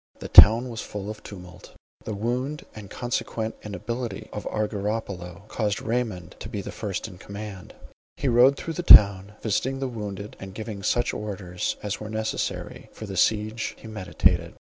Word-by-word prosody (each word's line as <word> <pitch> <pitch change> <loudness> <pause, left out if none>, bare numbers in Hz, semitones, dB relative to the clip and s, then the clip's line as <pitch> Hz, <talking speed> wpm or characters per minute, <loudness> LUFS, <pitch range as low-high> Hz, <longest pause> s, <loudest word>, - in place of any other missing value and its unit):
The - - -8
town 115 +4 +9
was 115 -2 -5
full 105 0 -6
of 105 0 -10
tumult. 90 -3 -12 0.3
The 110 - -3
wound, 125 +7 -2
and 105 -3 -10
consequent 115 -1 -3
inability 105 +2 -5
of - - -5
Argyropylo, 100 -3 -3
caused 105 -3 -1
Raymond 110 -7 -3
to - - -7
be - - -4
the - - -7
first - - -4
in 90 - -12
command. 100 -2 -8 0.4
He 140 - -2
rode 125 +3 +5
through 165 - -5
the 170 - -3
town, 100 - +8
visiting 120 +5 0
the 135 - -1
wounded, 105 -4 -6
and 95 -1 -9
giving 110 -2 -6
such 120 +4 +1
orders 95 -4 -4
as 105 -1 -3
were 105 - -7
necessary 110 0 -3
for 110 - -8
the 100 -2 -6
siege 110 +3 0
he - - -12
meditated. 95 -7 0
105 Hz, 170 wpm, -25 LUFS, 100-115 Hz, 0.4 s, town